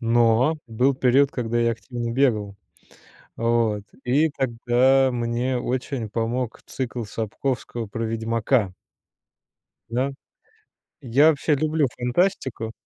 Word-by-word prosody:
но 120 +5 +3
был 125 +5 +1
период, 130 +2 +3
когда 120 -3 -2
я 115 0 +2
активно 120 +2 -5
бегал. 110 -6 +1 0.8
Вот. 115 -3 +1 0.2
И 145 +6 +3
тогда 130 0 +2
мне 120 +1 -1
очень 125 -2 -3
помог 115 +2 -2
цикл 120 -2 -4
Сапковского 115 +2 -3
про 115 +3 -4
"Ведьмака". 115 -1 0 1.2
Да? 125 +4 0 0.9
Я 140 +4 +4
вообще 150 0 +1
люблю 155 +1 +1
фантастику. 125 - 0
120 Hz, 105 wpm, -23 LUFS, 115-135 Hz, 1.2 s, Я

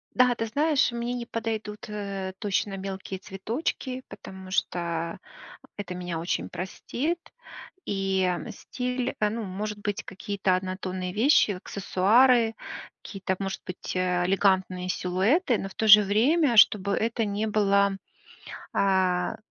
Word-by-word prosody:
Да, 250 -1 +5
ты 225 - -2
знаешь, 285 +3 +2
мне 235 +1 -3
не 245 -1 -4
подойдут, 220 -1 -4
э, 200 -2 -5
точно 200 0 -1
мелкие 190 0 -6
цветочки, 240 - -4
потому 190 0 -10
что 170 -3 -2 0.6
это 200 -3 -5
меня 175 -2 -4
очень 95 - -2
простит. 270 - -3 0.7
И 195 -2 0 0.2
стиль, 250 0 -3
ну, 215 +2 0
может 210 +2 -4
быть, 205 -1 -3
какие-то 195 -1 -1
однотонные 185 -1 -4
вещи, 230 -1 +4
аксессуары, 225 +6 +3 0.5
какие-то, 190 -2 -3
может 195 -1 -4
быть, 185 -1 -6
э, 180 -1 +1
элегантные 190 -1 +1
силуэты. 215 - +1
Но 195 - -4
в - - -14
то 220 - 0
же 210 0 +10
время, 240 - +3
чтобы 200 -1 +6
это 230 0 0
не 205 +1 -2
было, 200 -2 +2 0.8
а, 185 -2 +1
200 Hz, 125 wpm, -26 LUFS, 190-225 Hz, 0.8 s, же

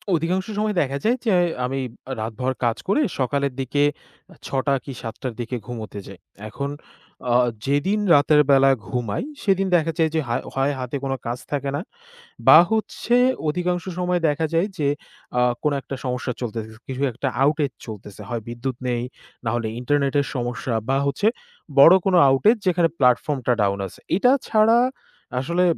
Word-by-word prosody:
অধিকাংশ 180 +4 0
সময় 210 -1 0
দেখা 140 -1 -1
যায় 235 +4 +2
যে 220 - +3 0.3
আমি 135 +2 -2 0.3
আ - - -4
রাতভর 120 +4 -2
কাজ 115 0 +1
করে 245 +10 +2 0.2
সকালের 140 +1 0
দিকে 140 +2 +1 0.6
৬ - - -5 0.2
টা 140 - +4
কি 140 - -6
৭ 115 -1 -6
টার 130 -3 -3
দিকে 120 +2 -4
ঘুমোতে 110 -4 -6
যাই। 95 -2 -11 0.3
এখন 140 +6 -4 0.6
আ - - +4 0.3
যেদিন 145 +10 +1 0.2
রাতের 150 +1 +5
বেলা 135 0 +6 0.2
ঘুমাই 125 - -2 0.2
সেদিন 195 -1 +2
দেখা 165 -1 +2
যায় 160 -2 +3
যে - - +3
হায় 120 - -1
হয় 135 +2 +1
হাতে 125 +1 -4
কোন 135 - -1
কাজ 120 +1 -3
থাকে 140 -1 -1
না 145 - -2 0.7
বা 155 - +10
হচ্ছে 220 +2 0 0.3
অধিকাংশ 175 +2 -1 0.2
সময় 180 0 +1
দেখা 155 +2 0
যায় 165 +4 +2
যে, 145 -4 0 0.5
আ - - +4 0.2
কোন 150 - +2
একটা 135 - -6
সমস্যা 125 0 -2
চলতেছে। 115 -2 -4 0.2
কিছু 130 0 -5
একটা 120 +4 -3 0.2
outage 145 -2 +1
চলতেছে। 105 -1 -9
হয় 120 -2 -3
বিদ্যুৎ 120 +2 -4
নেই 120 -1 -1 0.4
না - - +1
হলে 115 -2 -1
internet-এর 140 +1 +1
সমস্যা 120 0 -3 0.2
বা 135 - +3
হচ্ছে 140 +9 +1 0.5
বড় 165 +6 +10
কোন 195 - +2 0.2
outage 210 - +4
যেখানে 175 -2 +3
platform-টা 125 0 +2
down 100 -1 +1
আছে। - - -15 0.2
এটা 245 +6 +4 0.2
ছাড়া 220 +1 +4 0.6
আসলে 170 +7 0
140 Hz, 170 wpm, -22 LUFS, 125-170 Hz, 0.7 s, বা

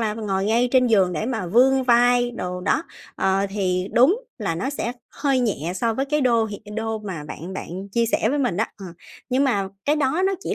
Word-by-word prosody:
là 215 -2 -1
ngồi 195 -3 -2
ngay 235 +4 +2
trên 255 -1 +5
giường 195 -6 +3
để 195 +7 -2
mà 225 -8 -2
vươn 260 +7 +4
vai 245 0 +4
đồ 180 -5 -5
đó, 190 - +1 0.3
ờ, 195 +1 +1
thì 185 -2 -1
đúng 320 - +4 0.2
là 195 -7 -2
nó 225 +12 -2
sẽ 245 -4 -3 0.2
hơi 275 -3 0
nhẹ 180 - -1
so 230 +3 0
với 270 +4 0
cái 300 +1 0
đô 235 -3 +3
hiện 210 -1 -7
đô 225 0 -2
mà 185 -8 -6
bạn 165 +5 -8
bạn 190 +2 -6
chia 235 -1 +2
sẻ 220 -1 +1
với 290 - 0
mình 245 -10 0
đó, 220 - +2
ờ. 195 - -8 0.4
Nhưng 265 +2 +2
mà 200 -8 0 0.2
cái 295 +2 +2
đó 300 +5 +1
nó 390 - +1
chỉ - - -2
225 Hz, 230 wpm, -23 LUFS, 190-255 Hz, 0.4 s, trên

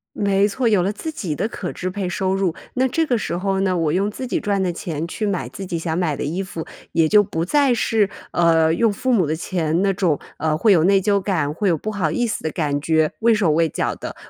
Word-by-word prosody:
没 200 0 +2
错， 235 +4 -1
有 205 -5 +3
了 195 +3 0
自 315 +9 -5
己 180 - -4
的 205 - -1
可 190 -5 -5
支 185 - -4
配 185 -2 -3
收 190 +1 -1
入。 190 -4 0 0.2
那 260 +1 +2
这 320 +6 0
个 245 -5 +1
时 175 - -3
候 195 +1 -1
呢， 185 -2 +1
我 160 -2 0
用 200 +3 +1
自 255 +5 -6
己 250 - -1
赚 200 -2 0
的 175 -2 -1
钱 165 -1 -4
去 215 - -3
买 200 -4 -1
自 195 - -8
己 170 - -2
想 160 -1 -2
买 165 -5 0
的 - - -3
衣 165 +6 -2
服， 175 -4 -6 0.3
也 165 -1 +3
就 205 +5 +5
不 165 -3 -3
再 280 +3 +3
是， 215 -3 +1 0.2
呃 165 -2 +3
用 225 +4 +2
父 255 +5 -1
母 185 -9 +3
的 155 - 0
钱 165 0 -1
那 195 -1 +2
种， 180 -6 +1 0.2
呃， 155 0 0
会 215 +4 +4
有 165 -3 +4
内 195 +1 +4
疚 200 +1 +2
感、 160 -7 -1
会 195 +3 0
有 165 - +2
不 215 - -4
好 185 -7 -1
意 240 +10 0
思 220 - -3
的 160 - -1
感 145 -3 -1
觉、 160 0 +2
畏 230 0 +4
手 195 -7 +2
畏 165 +1 +2
脚 - - -1
的。 - - -7
185 Hz, 280 characters per minute, -21 LUFS, 165-205 Hz, 0.3 s, 就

